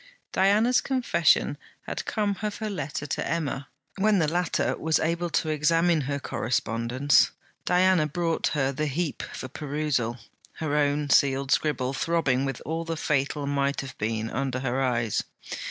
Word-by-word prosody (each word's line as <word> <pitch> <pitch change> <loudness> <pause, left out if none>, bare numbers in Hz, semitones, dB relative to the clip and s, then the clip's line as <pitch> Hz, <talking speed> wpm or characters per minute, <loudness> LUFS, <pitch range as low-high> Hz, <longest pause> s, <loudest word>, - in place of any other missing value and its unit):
Diana's 215 +6 +3
confession 260 -2 +2 0.2
had - - -5
come 205 -2 0
of 210 -1 -2
her 215 -1 -3
letter 145 -6 -4
to 140 - -2
Emma. 145 -4 -2 0.3
When 210 +1 +4
the 160 -4 +2
latter 175 +1 0
was 160 0 +1
able 170 +2 0
to 160 - 0
examine 165 +2 +3
her 140 +1 -2
correspondence, 120 +3 +1 0.4
Diana 180 -3 +4
brought 165 +2 0
her 135 -1 +2
the 150 +3 -2
heap 155 +1 -2
for - - -7
perusal, 140 -4 -2 0.4
her 155 -2 -2
own 145 -1 +1
sealed 135 0 +3
scribble, 135 -4 +1
throbbing 140 -4 +1
with 135 -2 -4
all 165 +2 -2
the 165 -1 -4
fatal 145 -1 0
might 140 0 0
have 135 -1 -8
been, 110 +1 -2
under 130 0 -2
her 135 0 -1
eyes. 120 -4 0
150 Hz, 155 wpm, -26 LUFS, 135-170 Hz, 0.4 s, When